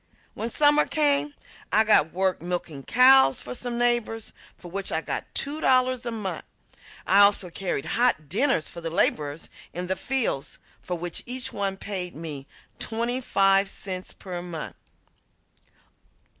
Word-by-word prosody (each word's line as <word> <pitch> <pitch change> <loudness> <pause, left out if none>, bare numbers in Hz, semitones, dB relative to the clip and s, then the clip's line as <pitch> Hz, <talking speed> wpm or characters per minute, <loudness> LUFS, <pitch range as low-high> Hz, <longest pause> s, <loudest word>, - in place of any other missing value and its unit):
When 230 - -4
summer 295 +4 +4
came 290 -1 +1 0.4
I 220 - +5
got 210 -8 +4
work 190 0 0
milking 175 -4 -4
cows 250 - +6
for 125 - -7
some 240 - -4
neighbors, 240 -2 0 0.2
for 175 - -12
which 195 +1 -2
I 160 - +1
got - - -4
two 295 +3 -1
dollars 255 -1 +2
a - - -2
month. 195 -7 -4 0.6
I 195 - +4
also 200 -3 +5
carried 180 -6 -3
hot 235 -11 +1
dinners 210 - +1
for 170 - -7
the 165 - -3
laborers 155 -4 0 0.3
in 180 +1 -3
the 190 +1 -1
fields, 260 - -1 0.2
for 180 - -4
which 175 0 -4
each 255 +1 -2
one 195 -1 -2
paid 185 -3 -4
me 150 -4 -7 0.3
twenty 235 +3 -2
five 195 -4 +3
cents 185 -2 -5
per 180 -2 -7
month. 175 -3 -7
195 Hz, 150 wpm, -25 LUFS, 175-245 Hz, 0.6 s, cows